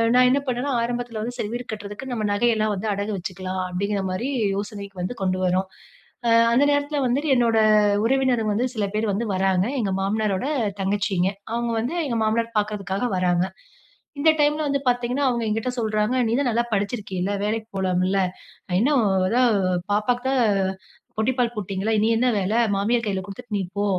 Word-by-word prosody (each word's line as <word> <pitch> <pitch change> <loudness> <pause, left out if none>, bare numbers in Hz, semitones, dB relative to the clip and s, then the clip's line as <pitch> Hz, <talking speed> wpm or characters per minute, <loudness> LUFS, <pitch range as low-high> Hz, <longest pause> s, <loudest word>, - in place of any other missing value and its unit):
நான் 250 0 +6
என்ன 270 +3 +3
பண்ணேனா, 255 +3 -1
ஆரம்பத்துல 240 -2 -3
வந்து 240 +3 -4
"சரி 210 - -3
வீடு 245 0 -4
கட்றதுக்கு 210 +5 -7
நம்ம 220 -3 -2
நகையெல்லாம் 215 0 +2
வந்து 200 +3 -4
அடகு 200 +2 -3
வச்சுக்கலாம்" 185 0 -4
அப்பிடீங்கிறமாரி 195 +4 -2 0.3
யோசனைக்கு 200 -1 -6
வந்து 185 +8 -3
கொண்டு 185 0 0
வர்றோம். 185 +1 +1 0.6
அ - - +4 0.2
அந்த 260 - +4
நேரத்துல 285 +1 0
வந்துட்டு 280 +5 0
என்னோட 235 -2 +3 0.5
உறவினர்கள் 250 -4 +2
வந்து 240 +5 +1
சில 210 -2 0
பேர் 215 -1 0
வந்து 220 +4 -1
வராங்க. 190 0 +2
எங்க 205 -5 0
மாமனாரோட 205 +1 0 0.4
தங்கச்சிங்க. 195 -2 +1 0.2
அவுங்க 235 0 -1
வந்து 240 +7 -2
எங்க 240 -5 -1
மாமனார் 230 +1 0
பாக்குறதுக்காக 205 0 -2
வராங்க. 180 -1 +2 0.7
இந்த 310 +3 +4
டைம்ல 295 +1 +2
வந்து 280 0 +1
பாத்தீங்கன்னா, 245 +3 0
அவுங்க 240 -2 -1
என்கிட்ட 220 +3 -1
சொல்றாங்க, 215 +2 0
"நீ 220 - -1
தான் 265 - +1
நல்லா 235 +1 +1
படிச்சிருக்கீல! 200 -2 -2
வேலைக்கி 220 +1 -2
போலாம்ல? 185 +1 +1 0.6
இன்னும் 265 0 +3 0.2
அதான் 245 +3 +3 0.4
பாப்பாவுக்கு 245 +5 +1 0.9
புட்டிப்பால் 240 +1 +1
போட்டீங்கள்ல, 200 +1 -2
இனி 215 +2 +3
என்ன 250 +2 +2
வேல? 195 +1 -1 0.2
மாமியார் 230 +4 +1
கையில 195 -2 -1
குடுத்துட்டு 210 +2 -6
நீ 195 - -1 0.2
போ" 205 - +1
215 Hz, 160 wpm, -23 LUFS, 195-245 Hz, 0.9 s, நான்